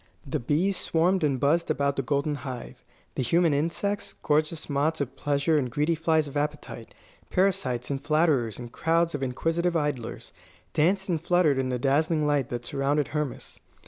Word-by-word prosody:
The - - -2
bees 165 +10 +1
swarmed 175 +2 +1
and 140 -4 +1
buzzed 165 +6 +2
about 140 -2 +1
the 135 - 0
golden 140 +3 0
hive. 130 -3 -7 0.3
The - - -2
human 165 +5 +3
insects, 170 +7 -1
gorgeous 155 +2 0
moths 150 +3 0
of 140 -3 -3
pleasure 145 +2 +1
and 130 -3 -2
greedy 150 +7 +1
flies 160 -1 +1
of 140 - -10
appetite, 145 -5 -4 0.3
parasites 135 -10 0
and 135 -1 -3
flatterers 150 -8 +2
and 120 -1 -8
crowds 165 +3 +1
of 145 - -3
inquisitive 165 +7 0
idlers, 145 -6 -3 0.4
danced 190 +5 +2
and 170 -4 -1
fluttered 170 -5 +3
in 130 -1 -1
the 125 - -1
dazzling 150 +4 +1
light 145 -3 +1
that 120 0 -4
surrounded 140 +3 0
Hermas. 150 -3 -4
150 Hz, 170 wpm, -27 LUFS, 135-165 Hz, 0.4 s, human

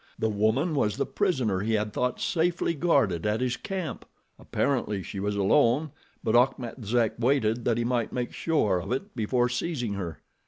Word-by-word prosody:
The 110 - 0
woman 110 - +1
was 105 -8 +1
the - - 0
prisoner 130 - 0
he 110 +3 -1
had 105 -1 0
thought 125 0 -1
safely 170 0 +1
guarded 135 - +2
at 105 +1 +1
his 125 -1 0
camp! 185 - -5 0.4
Apparently 105 -8 -1
she 95 - -6
was 100 +1 -1
alone, 130 +8 +3 0.3
but 110 - +1
Achmet 125 -1 +1
Zek 115 +1 +1
waited 120 -2 +1
that 115 -2 +2
he 120 - 0
might 120 -1 0
make 125 -1 -3
sure 110 - +1
of 95 +6 -6
it 195 +11 -3
before 120 +2 +1
seizing 125 -2 -2
her. 90 -5 -4
120 Hz, 180 wpm, -27 LUFS, 105-140 Hz, 0.4 s, alone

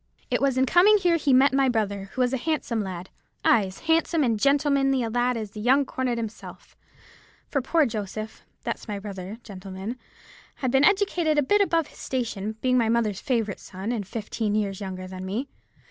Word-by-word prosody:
It - - +1
was 275 -2 +2
in 260 - +4
coming 370 +9 +6
here 350 -4 +2
he 285 -3 +1
met 265 +2 +5
my 270 -1 +3
brother, 205 -4 -1
who 260 - 0
was 250 +1 +2
a - - +2
handsome 260 -5 -1
lad—ay, 190 +3 -1
as 185 - -11
handsome 325 -1 +2
and 235 -3 +2
as 210 - -4
gentlemanly 275 -2 +3
a 225 - -3
lad 245 +1 +1
as 215 -3 -5
the 210 - -8
young 265 +6 +3
cornet 255 -2 -2
himself; 225 -1 -8 0.7
for 280 - -1
poor 315 +4 +3
Joseph—that's 215 0 -6
my 210 -2 -3
brother, 200 0 -7
gentlemen—had 200 +6 -8
been 270 +2 +4
educated 360 -6 +2
a 295 - +4
bit 410 +9 +3
above 335 -5 +2
his - - -17
station, 220 -5 -3
being 255 -1 +3
my 225 -2 +2
mother's 225 -4 +1
favourite 225 -6 -1
son, 190 +4 -6
and 215 -6 -3
fifteen 215 -1 -2
years 200 -2 -1
younger 185 -1 -5
than 185 0 -7
me. 210 +9 -3
240 Hz, 190 wpm, -25 LUFS, 205-275 Hz, 0.7 s, coming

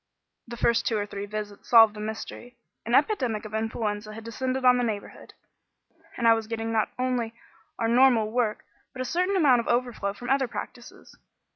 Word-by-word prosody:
The 235 0 -8
first 235 0 +2
two 225 - +1
or 205 - -1
three 200 0 -6
visits 210 -1 -7
solved 225 -3 +7
the 210 - -10
mystery. 220 +3 -7 0.3
An 235 - +2
epidemic 255 - +1
of 215 - -9
influenza 215 -1 -3
had 225 - -9
descended 255 +3 -3
on 250 0 +6
the - - +1
neighbourhood, 215 -4 -5 0.8
and 235 - +1
I 230 - +8
was 225 -1 -3
getting 225 0 -3
not 220 -1 +1
only 250 -3 -1 0.4
our 230 - 0
own 230 - +1
normal 245 -4 +4
work 230 -3 -1 0.3
but 255 - -4
a - - -7
certain 365 +8 0
amount 280 -9 +5
of 235 - -4
overflow 240 -5 -1
from 245 +4 -5
other 270 -1 +2
practices. - - -9
230 Hz, 190 wpm, -26 LUFS, 215-250 Hz, 0.8 s, I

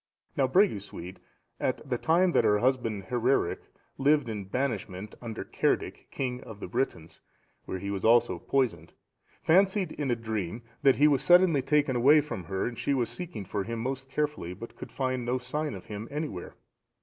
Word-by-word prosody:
Now 135 - +3
Bregusuid, 100 - 0 0.4
at 130 +3 -2
the 125 -2 -1
time 175 +3 +3
that - - +3
her 105 - +4
husband, 115 -4 0
Hereric, 125 -6 +1 0.4
lived 145 -2 +3
in 105 -3 -4
banishment, 105 -4 -3
under 115 -2 -5
Cerdic,(704) - - -1
king 125 -2 -3
of 105 -2 -10
the - - -5
Britons, 90 -5 -3 0.4
where 95 - -4
he 100 +2 -4
was 100 -2 -3
also 115 -6 +4
poisoned, 130 +5 -1 0.5
fancied, 190 +1 +3
in 145 -2 -3
a 120 - +2
dream, 110 -2 -4 0.2
that 135 -2 +5
he 150 - +5
was 140 -3 +3
suddenly 175 -2 +5
taken 145 -1 +2
away 140 +6 +6
from 140 - -4
her 95 +2 -2
and 120 -1 -4
she 140 - +1
was 120 -3 0
seeking 165 - -6
for 100 +1 -2
him 115 +3 -4
most 135 +3 -4
carefully, 145 - -2
but 115 +5 -10
could - - -9
find 130 -2 -1
no 125 +2 0
sign 145 +3 -3
of 95 - -10
him 105 +1 -6
anywhere. 145 - -5
125 Hz, 180 wpm, -29 LUFS, 105-145 Hz, 0.5 s, away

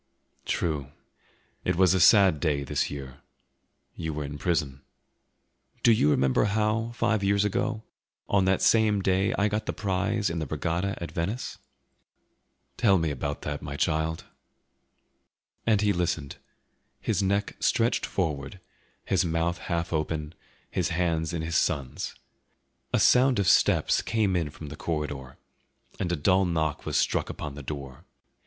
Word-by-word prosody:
"True; 75 -5 -1 0.8
it 90 - 0
was 95 0 +4
a 95 - +2
sad 95 -5 +6
day, 75 -3 0
this 70 - -1
year; 65 -2 -8 0.7
you 80 -3 -4
were 75 - -3
in 75 +1 -6
prison." 70 -5 -1 1.0
"Do 120 - +6
you 110 -9 +4
remember 65 +4 +3
how, 110 +2 0
five 115 -3 +1
years 100 +1 +2
ago, 105 +2 -1 0.4
on 95 -2 +2
that 95 0 +2
same 105 0 +3
day 95 +1 +2
I 100 - +2
got 105 +1 -2
the - - -1
prize 100 0 -1
in 85 - -3
the 80 - -3
regatta 85 +6 -2
at 85 - -6
Venice?" 100 +9 -3 1.2
"Tell 100 -5 +4
me 80 -3 0
about 70 +1 -4
that, 75 0 -4
my 70 -2 -6
child." 80 +1 0 1.4
And 105 -2 +4
he 105 -1 +3
listened, 85 -5 -2 0.6
his - - 0
neck 100 +1 0
stretched 115 0 +1
forward, 75 -2 -3 0.5
his 95 -1 +2
mouth 85 +1 -1
half 85 -1 -3
open, 80 0 -2 0.4
his 90 -1 0
hands 85 -2 0
in 85 -2 -3
his 85 +1 0
son's. 70 -6 -1 0.8
A - - +2
sound 130 +1 +5
of 100 -2 +1
steps - - +4
came 105 -4 0
in 85 -4 0
from 75 0 -9
the 75 - -7
corridor, 75 -5 -4 0.6
and 90 - -1
a - - +1
dull 95 +5 +3
knock 80 -4 -1
was - - 0
struck - - +1
upon 75 - -6
the 70 - -8
door. 70 -2 -7
85 Hz, 150 wpm, -27 LUFS, 75-100 Hz, 1.4 s, sad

